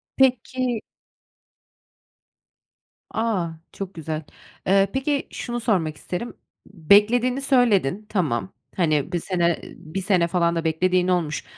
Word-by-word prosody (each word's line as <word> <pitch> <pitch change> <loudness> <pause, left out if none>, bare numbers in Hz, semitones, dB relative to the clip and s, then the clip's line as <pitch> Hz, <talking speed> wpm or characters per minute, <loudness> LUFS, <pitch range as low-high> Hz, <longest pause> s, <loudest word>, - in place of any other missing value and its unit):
Peki 255 -2 +1 2.3
A, 220 -6 0 0.3
çok 195 -1 -6
güzel. 160 -1 -4 0.4
Eee, 195 +1 +4
peki, 275 +1 -1
şunu 240 0 -4
sormak 180 -10 0
isterim, 185 +10 -5 0.3
beklediğini 210 - +3
söyledin, 215 - +2
tamam. 165 - -1 0.2
Hani, 155 -3 +1
1 175 - 0
sene, 170 -1 0
eee, - - -10
1 175 +3 -6
sene 185 -3 +2
falan 170 -1 +1
da 165 - -1
beklediğin 180 +3 +2
olmuş 170 -5 0
185 Hz, 115 wpm, -23 LUFS, 170-230 Hz, 2.3 s, Eee